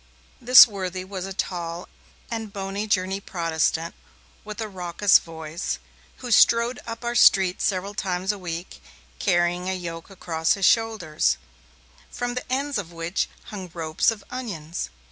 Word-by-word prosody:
This 250 +1 +10
worthy 185 -3 -5
was 190 -1 -5
a - - -7
tall 175 -2 -4 0.4
and 225 -2 -4
bony 195 +1 -4
Jersey 190 -1 0
Protestant 165 -2 -1 0.5
with 215 +1 -8
a 220 - -2
raucous 185 0 +3
voice, 160 +1 -5 0.5
who 245 - -4
strode 235 +2 +5
up 230 +1 -6
our 240 - -1
street 190 -6 +5
several 195 +1 -1
times 190 -1 -1
a 205 - -7
week, 170 - -6 0.4
carrying 175 +1 +1
a 190 - -1
yoke 170 -1 -7
across 165 -4 0
his 195 -2 0
shoulders, 215 -10 +2 0.7
from 245 0 -3
the 250 0 -6
ends 275 -1 0
of 175 -4 -7
which 170 +2 -2 0.2
hung 190 -4 -7
ropes 160 -2 +1
of 220 -3 -4
onions. 180 -11 -5
190 Hz, 145 wpm, -24 LUFS, 170-215 Hz, 0.7 s, This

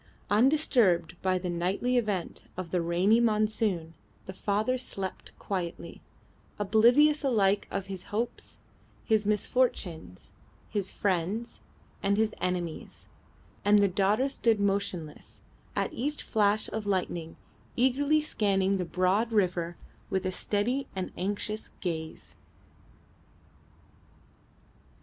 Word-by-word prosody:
Undisturbed 225 - +3
by 185 -1 +2
the 180 0 -4
nightly 185 +8 0
event 210 -7 -1
of 180 -3 -5
the 180 - +1
rainy 180 +7 +3
monsoon, 215 -7 +1 0.3
the 190 - -7
father 210 +6 0
slept 195 -7 -6
quietly, 170 -3 -5 0.6
oblivious 245 +9 +4
alike 205 -7 +2
of 195 -1 -3
his 190 -2 -7
hopes, 230 +3 -4 0.5
his 215 -2 +2
misfortunes, 205 - -1 0.4
his 200 -3 -2
friends, 200 +4 -1 0.4
and 200 +1 +1
his 220 0 +1
enemies; 175 -2 -4 0.5
and 205 0 +5
the 200 -1 +5
daughter 200 +7 +2
stood 230 -5 +1
motionless, 195 -6 -2 0.4
at - - -1
each 290 +5 -3
flash 210 -1 +2
of 215 -1 -4
lightning 175 -4 -2 0.4
eagerly 280 +5 +3
scanning 200 -9 +1
the 180 - -2
broad 185 +7 +1
river 175 -5 0 0.3
with 190 0 -1
a 185 - 0
steady 245 +9 -1
and 185 -1 -3
anxious 205 +3 -3
gaze. 160 -3 -5
200 Hz, 110 wpm, -29 LUFS, 180-225 Hz, 0.6 s, and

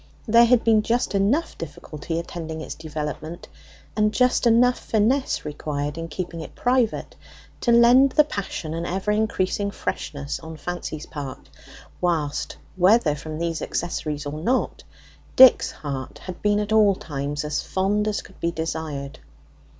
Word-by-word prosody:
There 230 +2 +7
had 240 0 +4
been 220 -2 +4
just 235 +2 0
enough 215 +12 +1
difficulty 155 +1 -6
attending 165 -1 -5
its 155 - -6
development, 155 +1 -6 0.5
and 210 0 +2
just 250 +1 +2
enough 245 +2 +4
finesse 235 - 0
required 150 -1 -3
in 165 0 -5
keeping 170 -1 -5
it - - -10
private, 245 -2 0 0.4
to 240 - +1
lend 245 +3 +6
the 300 - +6
passion 195 - -5
an 165 +1 -3
ever 190 +3 -1
increasing 205 -2 0
freshness 145 -7 -4
on 160 -1 -9
Fancy's 155 -2 -5
part, 140 -4 -8 0.5
whilst, 160 -5 -1 0.2
whether 185 -3 +4
from 155 +1 -6
these 165 0 -2
accessories 150 -3 -3
or 145 - -4
not, 245 +11 -1 0.5
Dick's 260 -1 +8
heart 135 -3 -6
had 185 -2 -9
been 205 0 +2
at 210 0 -3
all 210 -3 +5
times 145 -2 -4
as 150 0 -1
fond 205 +3 0
as 210 - -1
could - - -17
be 170 - 0
desired. 160 -4 -4
175 Hz, 150 wpm, -23 LUFS, 155-220 Hz, 0.5 s, Dick's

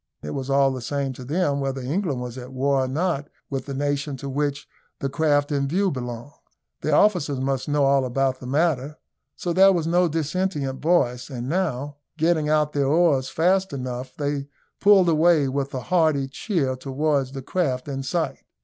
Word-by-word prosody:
It 75 - -5
was 135 0 -4
all 135 0 +4
the 130 -1 -5
same 140 +1 -2
to 130 - -10
them 145 +1 0
whether 135 -1 -2
England 140 0 -2
was 125 -1 -6
at 125 0 -8
war 135 +1 +1
or - - -3
not 150 +1 -1 0.2
with 135 -1 -3
the 140 - -4
nation 145 0 -1
to 140 +1 -6
which 145 +1 -2 0.3
the 135 - -3
craft 145 0 +1
in 140 -1 0
view 190 +6 +1
belonged. 125 +1 -6 0.5
Their 150 - +1
officers 155 -10 +3
must 135 +1 -1
know 145 -1 +2
all 135 0 +3
about 130 +1 0
the 125 - -8
matter, 150 0 0 0.4
so 175 - -2
there 190 +2 +7
was 170 -4 0
no 175 +2 +3
dissentient 155 -3 -2
voice; 125 -7 +1
and 125 -2 -5
now, 145 -4 -2 0.2
getting 160 -1 +2
out 150 -1 +2
their 140 -2 +1
oars 145 -4 +3
fast 185 +2 +1
enough, 130 -1 -5
they 145 -1 -2 0.3
pulled 200 -3 +6
away 160 -2 +4
with 140 +1 -2
a 130 - -4
hearty 155 -3 +2
cheer 135 - -1
towards 135 0 -1
the 135 -1 -6
craft 135 -6 -1
in 135 -1 -3
sight. 160 +4 -2
140 Hz, 185 wpm, -24 LUFS, 135-160 Hz, 0.5 s, there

